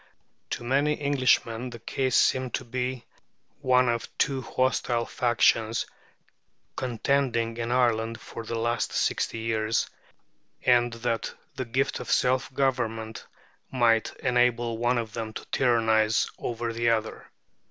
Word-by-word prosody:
To - - -4
many 140 +5 +1
Englishmen 130 -4 +1
the 120 - -8
case 130 +3 0
seemed 130 -2 +2
to 130 - -5
be 125 0 -3 0.5
one 130 -2 +3
of 120 -1 -1
two 135 -2 +1
hostile 120 -1 0
factions 115 -2 +2 0.9
contending 120 -2 0
in 115 0 -2
Ireland 115 -2 +1
for 115 - -8
the 115 +1 -4
last 115 0 -1
sixty - - 0
years, 115 0 0 0.8
and 120 -1 +4
that 115 0 -2 0.2
the 130 -1 -3
gift 130 +4 -1
of - - -7
self 130 +1 +2
government 115 -5 -1 0.4
might 115 -3 +2
enable 120 -2 +2
one 120 +1 +2
of 115 -2 -3
them 110 -2 -4
to - - -7
tyrannize 110 -3 +3
over 115 -1 -3
the 115 +1 +1
other. 110 -1 -1
120 Hz, 130 wpm, -27 LUFS, 115-130 Hz, 0.9 s, and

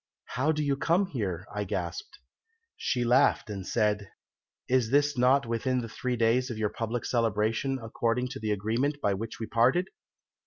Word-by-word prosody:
'How 140 +5 +1
do 150 -1 -1
you 140 -1 +1
come 170 +7 +2
here?' 100 - -3
I 105 0 -2
gasped. 415 - -4 0.6
"She 125 -2 -1
laughed 120 -2 +3
and 95 -2 -6
said, 105 -3 0 0.6
'Is 125 -3 +2
this 145 +2 +3
not 130 +2 +4
within 125 +2 0
the 115 - -5
three 125 +2 -2
days 120 +3 +2
of 120 - -4
your 110 -1 0
public 115 +2 -3
celebration, 115 +2 +1
and 115 - -9
according 120 +2 -1
to 135 +1 -6
the 110 - -3
agreement 115 +8 0
by 100 -7 +1
which 110 +4 -5
we 115 - -3
parted?' 130 +12 +2
120 Hz, 180 wpm, -28 LUFS, 110-135 Hz, 0.6 s, not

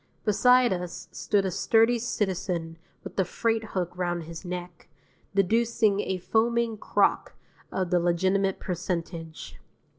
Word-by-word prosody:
Beside 250 +2 +5
us 180 -1 -6
stood 200 -2 0
a 190 - -1
sturdy 225 +6 +3
citizen 180 -7 -2 0.2
with - - -7
a - - +5
freight 225 +5 -1
hook 180 -1 -2
round 175 -1 -2
his 165 +2 -9
neck, 180 -1 -7 0.5
deducing 220 +1 +2
a 190 -2 -1
foaming 230 +4 +1
crock 210 - +1 0.4
of 185 -2 -2
the 180 - +4
legitimate 185 +3 +1
percentage. 170 -3 -5
190 Hz, 125 wpm, -27 LUFS, 175-220 Hz, 0.5 s, Beside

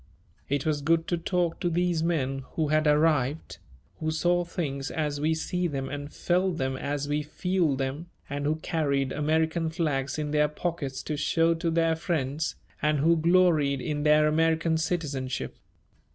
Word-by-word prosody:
It 140 0 0
was 150 -2 0
good 165 +2 +2
to 175 - +1
talk 175 -1 -1
to 175 - 0
these 175 -1 +1
men 140 -5 0
who 155 -3 0
had 155 0 +2
"arrived," 150 -1 +1 0.4
who 155 - -1
saw 175 +3 +2
things 140 -6 -3
as 150 -2 -2
we 160 +1 +2
see 180 +2 -1
them 135 -4 -3
and 145 +1 -6
felt 180 0 0
them 130 0 -1
as 145 +1 -3
we 145 +1 0
feel 170 0 0
them, 135 +5 -3 0.2
and 145 0 -3
who 155 - +2
carried 140 -4 -1
American 160 +2 +1
flags 145 -5 -1
in 150 -1 -2
their 150 0 +3
pockets 150 -3 -4
to 155 - -3
show 165 +3 +2
to 165 0 -2
their 165 0 +2
friends 155 -3 -2 0.3
and 150 0 +2
who 165 +4 +4
gloried 160 -4 +3
in 150 +2 -2
their 150 0 +5
American 160 +1 +2
citizenship. 150 -6 -2
155 Hz, 165 wpm, -27 LUFS, 145-165 Hz, 0.4 s, their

